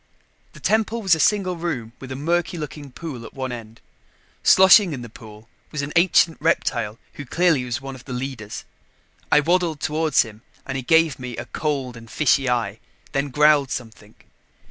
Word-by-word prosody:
The -, -, -13 dB
temple 220 Hz, +1 st, 0 dB
was 190 Hz, -3 st, +4 dB
a 160 Hz, -, +2 dB
single 185 Hz, +2 st, +2 dB
room 130 Hz, -10 st, -4 dB
with 130 Hz, -1 st, -9 dB
a -, -, -4 dB
murky 170 Hz, +5 st, -1 dB
looking 150 Hz, -2 st, -7 dB
pool 135 Hz, -4 st, -7 dB
at -, -, -11 dB
one 130 Hz, -1 st, -4 dB
end. 115 Hz, -2 st, -9 dB, 0.6 s
Sloshing 190 Hz, -1 st, +7 dB
in 125 Hz, -3 st, -6 dB
the 120 Hz, -, -9 dB
pool 110 Hz, 0 st, -13 dB, 0.2 s
was 150 Hz, -2 st, -3 dB
an 145 Hz, -, -5 dB
ancient 170 Hz, -1 st, +4 dB
reptile 120 Hz, -9 st, 0 dB, 0.2 s
who 145 Hz, -, -8 dB
clearly 165 Hz, -3 st, +2 dB
was 125 Hz, +3 st, -3 dB
one 135 Hz, 0 st, -7 dB
of 130 Hz, -2 st, -12 dB
the 130 Hz, -, -9 dB
leaders. 125 Hz, -4 st, -5 dB, 0.7 s
I 150 Hz, -, +6 dB
waddled 170 Hz, -1 st, +1 dB
toward 155 Hz, 0 st, -1 dB
him 110 Hz, -2 st, +2 dB, 0.2 s
and 135 Hz, -, -5 dB
he 135 Hz, -, -2 dB
gave 160 Hz, +1 st, +3 dB
me 125 Hz, -2 st, -6 dB
a -, -, -5 dB
cold 140 Hz, -5 st, -3 dB
and 115 Hz, -1 st, -12 dB
fishy 135 Hz, -1 st, +2 dB
eye, 115 Hz, -3 st, -1 dB, 0.3 s
then 140 Hz, +1 st, -1 dB
growled 150 Hz, -1 st, +4 dB
something. 110 Hz, -4 st, -7 dB
140 Hz, 185 wpm, -22 LUFS, 120-165 Hz, 0.7 s, Sloshing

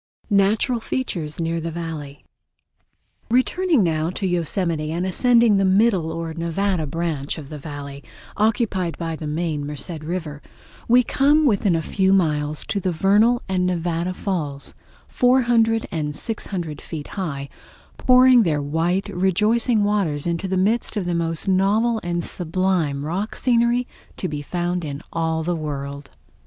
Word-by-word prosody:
Natural 205 Hz, +5 st, +2 dB
Features 175 Hz, -, -3 dB
Near 165 Hz, 0 st, -1 dB
The 165 Hz, -, -3 dB
Valley 160 Hz, -4 st, -6 dB, 1.0 s
Returning 280 Hz, -, +2 dB
now 160 Hz, -1 st, 0 dB
to 190 Hz, +2 st, -4 dB
Yosemite 170 Hz, -3 st, -1 dB
and 170 Hz, +3 st, -2 dB
ascending 235 Hz, +2 st, +4 dB
the 195 Hz, -, +2 dB
middle 190 Hz, -3 st, +3 dB
or 165 Hz, 0 st, -4 dB
Nevada 170 Hz, 0 st, -1 dB
branch 155 Hz, -2 st, -3 dB
of 145 Hz, -3 st, -9 dB
the 150 Hz, -, -7 dB
Valley, 140 Hz, -1 st, -8 dB, 0.3 s
occupied 210 Hz, -5 st, 0 dB
by 165 Hz, -1 st, -3 dB
the 155 Hz, -1 st, -6 dB
main 155 Hz, -1 st, -2 dB
Merced 150 Hz, +3 st, -5 dB
River, 155 Hz, -2 st, -5 dB, 0.5 s
we 245 Hz, +2 st, +5 dB
come 290 Hz, +5 st, +3 dB
within 200 Hz, -7 st, +2 dB
a 165 Hz, -, -1 dB
few 190 Hz, +3 st, +2 dB
miles 150 Hz, -5 st, +1 dB
to 200 Hz, -, -1 dB
the 185 Hz, -1 st, -1 dB
Vernal 210 Hz, +8 st, +3 dB
and 185 Hz, -1 st, 0 dB
Nevada 175 Hz, 0 st, -1 dB
Falls, 150 Hz, -9 st, -4 dB, 0.3 s
400 240 Hz, -3 st, +3 dB
and 150 Hz, -3 st, -3 dB
600 175 Hz, -7 st, -3 dB
feet 150 Hz, -3 st, -7 dB
high, 140 Hz, -8 st, -4 dB, 0.5 s
pouring 255 Hz, -1 st, +6 dB
their 160 Hz, -8 st, +1 dB
white, 165 Hz, +6 st, 0 dB
rejoicing 210 Hz, +5 st, +2 dB
waters 195 Hz, -9 st, +1 dB
in 170 Hz, -1 st, 0 dB
the 190 Hz, +2 st, -2 dB
midst 215 Hz, +4 st, +1 dB
of 195 Hz, -, -1 dB
the 175 Hz, -, -1 dB
most 165 Hz, 0 st, -2 dB
novel 210 Hz, +5 st, +2 dB
and 175 Hz, 0 st, -2 dB
sublime 170 Hz, -5 st, -1 dB
rock 190 Hz, +7 st, -3 dB
scenery 240 Hz, 0 st, +2 dB, 0.3 s
to 185 Hz, -, -2 dB
be 150 Hz, -3 st, -4 dB
found 175 Hz, +3 st, -2 dB
in 145 Hz, -1 st, -6 dB
all 160 Hz, -1 st, -1 dB
the 175 Hz, +2 st, -1 dB
World. 140 Hz, -2 st, -5 dB
175 Hz, 145 wpm, -22 LUFS, 155-205 Hz, 1.0 s, pouring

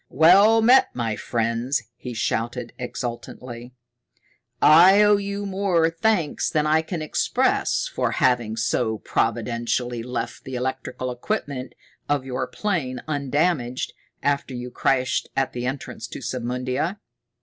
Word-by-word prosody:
"Well 200 Hz, -, +6 dB
met, 250 Hz, +4 st, +6 dB
my 115 Hz, -3 st, -1 dB
friends!" 115 Hz, +4 st, -1 dB
he 125 Hz, 0 st, -7 dB
shouted 120 Hz, +2 st, -2 dB
exultantly. 125 Hz, 0 st, -6 dB, 0.8 s
"I 180 Hz, +7 st, +7 dB
owe 210 Hz, 0 st, +5 dB
you 200 Hz, 0 st, -4 dB
more 190 Hz, -4 st, +1 dB
thanks 170 Hz, -3 st, 0 dB
than 150 Hz, -1 st, +1 dB
I 155 Hz, +1 st, +3 dB
can 160 Hz, 0 st, -5 dB
express 155 Hz, -, +1 dB
for -, -, -1 dB
having 120 Hz, -3 st, +1 dB
so 115 Hz, -1 st, 0 dB
providentially 115 Hz, +2 st, -1 dB
left 120 Hz, 0 st, -5 dB
the 130 Hz, -, -6 dB
electrical 130 Hz, 0 st, -3 dB
equipment 130 Hz, -, -4 dB, 0.3 s
of 145 Hz, -2 st, 0 dB
your 130 Hz, -1 st, -3 dB
plane 145 Hz, -, -2 dB
undamaged 145 Hz, -3 st, -1 dB, 0.3 s
after 140 Hz, -2 st, 0 dB
you 125 Hz, 0 st, -6 dB
crashed 130 Hz, 0 st, 0 dB
at 135 Hz, -1 st, 0 dB
the 125 Hz, 0 st, -3 dB
entrance 135 Hz, +1 st, -5 dB
to -, -, -8 dB
Submundia. 125 Hz, -, -2 dB
130 Hz, 125 wpm, -23 LUFS, 120-165 Hz, 0.8 s, I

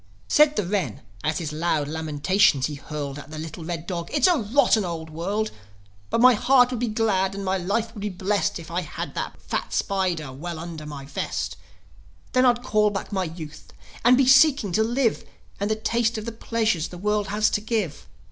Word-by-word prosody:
Said 300 Hz, 0 st, +5 dB
the 210 Hz, -, 0 dB
wren, 180 Hz, -, -2 dB, 0.2 s
as 155 Hz, +1 st, 0 dB
his 155 Hz, -4 st, -4 dB
loud 155 Hz, -2 st, 0 dB
lamentations 155 Hz, 0 st, +2 dB
he 150 Hz, -, -3 dB
hurled 145 Hz, -1 st, -6 dB
At 145 Hz, -, -11 dB
the 155 Hz, -, -7 dB
little 160 Hz, +1 st, -7 dB
red 165 Hz, 0 st, -4 dB
dog, 170 Hz, -2 st, -4 dB
"It's 295 Hz, -, +3 dB
a 360 Hz, -2 st, +5 dB
rotten 230 Hz, -2 st, +3 dB
old 165 Hz, -3 st, -5 dB
world! 200 Hz, +7 st, -2 dB, 0.6 s
But 230 Hz, -, +1 dB
my 255 Hz, 0 st, +8 dB
heart 250 Hz, +2 st, +4 dB
would 250 Hz, -, -3 dB
be 245 Hz, -, 0 dB
glad, 200 Hz, -3 st, +1 dB
and 200 Hz, 0 st, -5 dB
my 190 Hz, 0 st, 0 dB
life 220 Hz, +5 st, -1 dB
would 210 Hz, -, -8 dB
be 210 Hz, -, -2 dB
blest 200 Hz, +2 st, -1 dB
If 165 Hz, -1 st, -10 dB
I 175 Hz, +2 st, 0 dB
had 155 Hz, -, -6 dB
that -, -, -5 dB
fat -, -, -4 dB
spider 180 Hz, -8 st, -1 dB
well 165 Hz, +5 st, -6 dB
under 160 Hz, -2 st, -7 dB
my 140 Hz, -2 st, -7 dB
vest. 140 Hz, -, -3 dB, 0.8 s
Then 255 Hz, 0 st, +4 dB
I'd 240 Hz, 0 st, +2 dB
call 215 Hz, -3 st, +3 dB
back 200 Hz, +1 st, -5 dB
my 190 Hz, -2 st, 0 dB
youth, 160 Hz, -2 st, -9 dB, 0.3 s
and 245 Hz, +2 st, +6 dB
be 270 Hz, -, +4 dB
seeking 265 Hz, -, +5 dB
to 215 Hz, -, +2 dB
live, 235 Hz, 0 st, +1 dB, 0.4 s
And 200 Hz, +1 st, -1 dB
to 220 Hz, -, +2 dB
taste 230 Hz, +1 st, 0 dB
of 215 Hz, -, -5 dB
the 230 Hz, -, -3 dB
pleasures 220 Hz, -7 st, -1 dB
the 180 Hz, -, -10 dB
world 210 Hz, +2 st, 0 dB
has 210 Hz, +1 st, +1 dB
to 210 Hz, -, 0 dB
give. 215 Hz, -8 st, -2 dB
195 Hz, 205 wpm, -24 LUFS, 160-225 Hz, 0.8 s, my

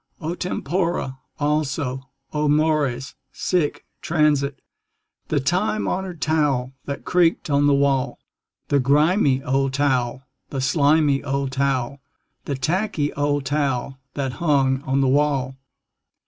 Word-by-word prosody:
O 165 Hz, -1 st, -3 dB
tempora! 170 Hz, -5 st, -2 dB, 0.2 s
Also, 145 Hz, -3 st, -1 dB, 0.2 s
O 150 Hz, 0 st, +1 dB
mores! 145 Hz, -4 st, +1 dB, 0.2 s
Sic 175 Hz, -5 st, -1 dB, 0.2 s
transit 150 Hz, -4 st, +1 dB, 0.7 s
The 155 Hz, -, +1 dB
time 185 Hz, +10 st, 0 dB
honored 185 Hz, -4 st, -3 dB
towel 140 Hz, -5 st, +1 dB
that 140 Hz, -, -5 dB
creaked 170 Hz, -3 st, +2 dB
on 145 Hz, 0 st, +3 dB
the 145 Hz, -, +4 dB
wall. 140 Hz, -2 st, +1 dB, 0.5 s
The 140 Hz, -, +3 dB
grimy 145 Hz, +1 st, +3 dB
old 135 Hz, -1 st, 0 dB
towel, 130 Hz, -2 st, 0 dB, 0.3 s
the 135 Hz, -, -4 dB
slimy 145 Hz, +1 st, +3 dB
old 140 Hz, -1 st, -1 dB
towel, 135 Hz, 0 st, -1 dB, 0.5 s
The 140 Hz, -, -2 dB
tacky 155 Hz, +2 st, -1 dB
old 145 Hz, -1 st, 0 dB
towel 135 Hz, -2 st, -1 dB, 0.2 s
that 135 Hz, -3 st, -2 dB
hung 135 Hz, -4 st, +2 dB
on 135 Hz, +1 st, +2 dB
the 135 Hz, -, +3 dB
wall. 135 Hz, -1 st, +1 dB
140 Hz, 120 wpm, -22 LUFS, 135-155 Hz, 0.7 s, the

